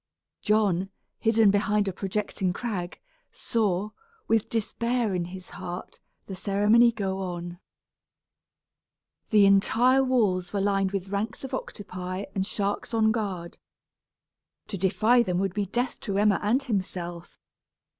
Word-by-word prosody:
John, 200 -3 +2 0.3
hidden 225 -2 +4
behind 205 0 +1
a 195 - -1
projecting 195 -1 -2
crag, 190 -6 -4 0.3
saw, 210 -3 -1 0.4
with 225 -2 +2
despair 235 0 -1
in 175 -2 -1
his 185 +1 -9
heart, 175 +1 -7 0.3
the 195 - -7
ceremony 210 +5 +4
go 195 -4 -3
on. 175 -2 -5 1.7
The 210 -2 +6
entire 235 +7 +4
walls 210 -9 +1
were 200 - 0
lined 195 -1 +1
with 195 -1 -3
ranks 205 +5 -3
of 270 0 -6
octopi 185 -5 -5
and 190 -1 -1
sharks 205 +3 -2
on 220 -1 +4
guard. 195 -6 -4 1.1
To 210 - -3
defy 215 +6 +3
them 180 -6 0
would 190 -1 0
be 205 -1 -1
death 245 +6 -2
to 195 -2 -3
Emma 205 -1 +3
and 235 +7 +2
himself. 180 -7 -4
200 Hz, 130 wpm, -27 LUFS, 185-220 Hz, 1.7 s, The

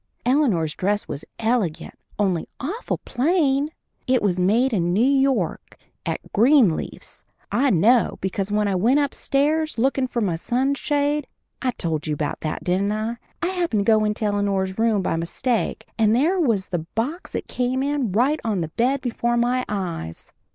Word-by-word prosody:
Eleanor's 235 - +2
dress 205 +2 -1
was 145 0 -5
elegant, 220 -8 -1 0.2
only 190 -5 0
awful 370 - -3
plain. 285 0 +1 0.4
It 255 -2 +2
was 185 -3 +1
made 230 +8 +3
in 175 -3 +1
New 220 +6 +3
York 270 -1 +1 0.3
at - - -4
Greenleaf's. 230 - +2 0.3
I 275 +3 +2
know, 230 +5 +3
because 195 +1 -2
when 210 0 +1
I 200 - 0
was 225 +9 +3
upstairs 295 +2 0
lookin' 265 +2 +1
for 245 - -3
my 185 -7 0
sunshade 285 - 0 0.3
I 260 - +1
told 165 -9 -3
you 150 - 0
about 145 0 -3
that, 155 - -4
didn't 190 +3 +1
I? 220 +2 -2 0.3
I 345 - +1
happened 340 - 0
to 225 - +5
get 215 - +2
into 210 +1 -1
Eleanor's 200 -1 0
room 220 -4 +2
by 165 - 0
mistake, 220 +8 -1
and 220 0 +4
there 330 +9 +2
was 225 - +1
the 175 - -1 0.2
box 280 +11 -3
it - - -3
came 255 +1 -1
in 280 -6 -1
right 260 +10 +2
on 210 -5 0
the 160 - -3
bed 250 - 0
before 240 -1 -1
my 245 +2 +1
eyes. 175 - -5
230 Hz, 165 wpm, -23 LUFS, 195-270 Hz, 0.4 s, to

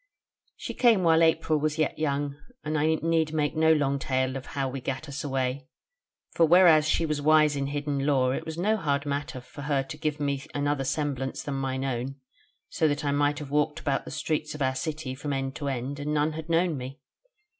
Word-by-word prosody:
"She - - -6
came 230 -7 +4
while 165 -1 +5
April 160 -1 +3
was 155 +1 -1
yet 155 -1 0
young: 145 -2 -1 0.3
and 155 0 -2
I 155 +1 +2
need 160 -1 0
make 150 -2 0
no 160 0 +4
long 140 -3 +2
tale 130 -1 -1
of 135 - -6
how 135 -1 +1
we 130 0 -5
gat 135 +4 -4
us 140 0 -5
away: 130 -1 -2 0.6
for 170 - +2
whereas 165 -2 +6
she 165 - +2
was 150 -2 -1
wise 155 0 +4
in 140 -1 -1
hidden 145 -1 -2
lore, 130 -3 +3
it - - -3
was 160 0 -6
no 210 +5 +1
hard 145 -6 -1
matter 140 -2 -3
for 145 - -11
her 140 -1 0
to 150 +3 -8
give 155 -1 -2
me 140 -2 -1
another 145 -1 0
semblance 135 -2 -2
than 145 - -4
mine 135 -1 -2
own, 130 +1 -3 0.5
so 160 - +1
that 145 0 -1
I 140 - +1
might 145 +1 +1
have 145 -2 -7
walked 150 +1 +1
about 140 -2 -1
the - - -7
streets 155 -1 -2
of 150 - -8
our 130 0 +1
city 145 0 -4
from 140 +2 -4
end 135 0 -2
to 145 - -4
end, 135 +1 -3
and 150 +1 -2
none 150 +1 +2
had 160 +1 -7
known 165 -1 +2
me. 130 +2 -7
145 Hz, 220 wpm, -27 LUFS, 135-155 Hz, 0.6 s, whereas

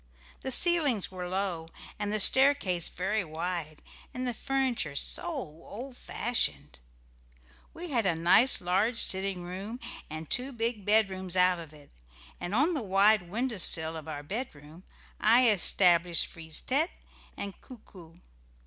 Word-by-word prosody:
The - - -5
ceilings 295 - +3
were 180 -1 -6
low, 185 -4 -3 0.3
and 205 -1 -2
the 215 - 0
staircase 265 - +4
very 195 +3 -2
wide, 160 -1 -5 0.3
and 255 0 -3
the 245 - -1
furniture 250 - -2
so 140 - +1
old 245 - -8
fashioned. 230 - -2 0.9
We 345 -1 -8
had 230 -6 0
a 170 - +1
nice 175 +11 +4
large 195 +7 0
sitting 190 -1 -2
room, 195 +7 -7 0.3
and 155 +1 -7
two 255 - 0
bed 220 -3 +1
rooms 185 -1 -5
out 180 -1 +3
of 160 -3 -10
it, 150 -2 -18 0.5
and 185 +4 -4
on 295 +8 +2
the 295 - -2
wide 200 -2 +3
window 235 +3 -2
sill 160 -2 +3
of 160 -1 -9
our 145 -2 -6
bedroom 160 - -7 0.3
I 240 +3 +5
established 175 -3 +4
Frise 160 -2 -5
tête 300 +6 0 0.5
and 200 -1 -7
Coo 255 - -12
coo. 165 -4 -15
195 Hz, 145 wpm, -28 LUFS, 170-240 Hz, 0.9 s, I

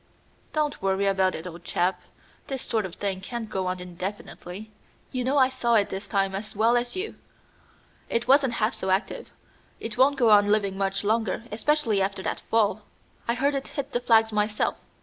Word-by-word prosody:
"Don't 300 -2 -1
worry 195 +1 +1
about 190 -1 +2
it, 160 - -7
old 175 -1 -8
chap. 180 +1 0 0.5
This 270 -2 -4
sort 220 -4 -1
of 180 - -11
thing 195 -2 -3
can't 235 +3 -5
go 190 -1 -1
on 185 0 -2
indefinitely. 185 +2 -7 0.4
You 255 -1 -2
know 265 +3 +1
I 260 -2 +6
saw 240 -3 +1
it 205 -2 +3
this 195 +1 -5
time 195 -1 +1
as 210 +3 -5
well 225 +3 +4
as 240 0 -1
you. 390 +4 -4 0.9
It 235 +1 -1
wasn't 270 -2 +5
half 220 +1 +1
so 190 - -4
active. 190 +4 -1 0.5
It 225 +1 -6
won't 275 +2 +5
go 235 -4 +4
on 205 -1 +7
living 205 -2 +2
much 195 0 -1
longer, 220 0 0
especially 230 -2 +1
after 190 0 -1
that - - -2
fall. 215 -1 +1 0.5
I 235 - +1
heard 280 +3 +1
it 275 -1 -3
hit 280 0 -3
the 240 - 0
flags 225 -2 +4
myself. 210 0 0
215 Hz, 190 wpm, -26 LUFS, 195-245 Hz, 0.9 s, on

